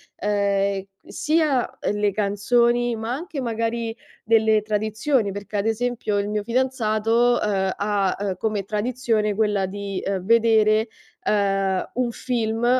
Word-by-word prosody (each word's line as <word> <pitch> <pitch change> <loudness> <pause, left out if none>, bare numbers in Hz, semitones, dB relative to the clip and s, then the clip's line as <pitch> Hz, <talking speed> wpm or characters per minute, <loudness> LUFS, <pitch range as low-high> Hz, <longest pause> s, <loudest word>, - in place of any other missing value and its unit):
ehm, 200 -1 0 0.2
sia, 300 -5 0
ehm, 205 - -1
le 205 -1 +1
canzoni, 235 +4 +1
ma 225 +1 -4
anche 305 +1 -5
magari 230 -1 -2 0.3
delle 220 -1 +3
tradizioni, 215 +2 0
perché 200 +1 -5
ad 200 +2 0
esempio 225 -2 -1
il 200 0 0
mio 210 0 -1
fidanzato, 235 0 +1
uhm, 195 -2 0
ha, 200 -2 0
ehm, 200 -2 -2
come 210 -1 -1
tradizione 215 0 0
quella 205 -2 +1
di, 200 0 -5
ehm, 190 -2 -2
vedere, 220 0 +4 0.3
ehm, 195 -2 0
un 250 0 0
film 230 -2 -2
215 Hz, 130 wpm, -23 LUFS, 200-235 Hz, 0.3 s, vedere